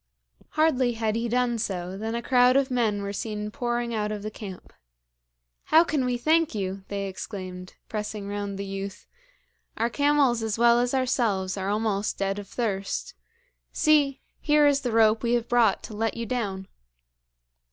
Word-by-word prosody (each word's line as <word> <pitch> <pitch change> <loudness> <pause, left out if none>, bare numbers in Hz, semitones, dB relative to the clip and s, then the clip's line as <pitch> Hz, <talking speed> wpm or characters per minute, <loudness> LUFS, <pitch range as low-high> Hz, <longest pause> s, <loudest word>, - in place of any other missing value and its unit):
Hardly 265 -6 +3
had 220 -1 -1
he 230 +1 -1
done 240 -1 +1
so 185 -4 -3
than 220 +3 -3
a 235 - -3
crowd 250 -1 +4
of 275 -1 +1
men 220 -5 +1
were 200 0 -4
seen 210 0 -4
pouring 240 0 -2
out 210 -1 -1
of 210 -1 -5
the 215 - -4
camp. 195 -4 -9 0.9
'How 320 +2 +6
can 300 -6 0
we 250 -1 0
thank 315 +2 +2
you!' 195 -1 -3
they 200 -1 -3
exclaimed, 185 -1 -7
pressing 210 -1 -4
round 205 -1 -4
the 200 - -4
youth. 195 0 -6 0.7
'Our 230 +1 0
camels 285 -4 +3
as 220 -1 -2
well 235 0 +5
as 245 +2 0
ourselves 220 -8 0
are 195 0 -3
almost 210 -1 -1
dead 195 +1 -1
of 205 - -8
thirst. 210 - -3 0.6
See! 290 -3 +3 0.2
here 295 -1 +4
is 285 -1 +3
the 250 -3 -2
rope 220 -1 +4
we 235 0 0
have 240 -1 0
brought 235 -5 +3
to - - -8
let 225 +2 -1
you 230 - -3
down.' 200 -6 -3
225 Hz, 175 wpm, -26 LUFS, 200-245 Hz, 0.9 s, How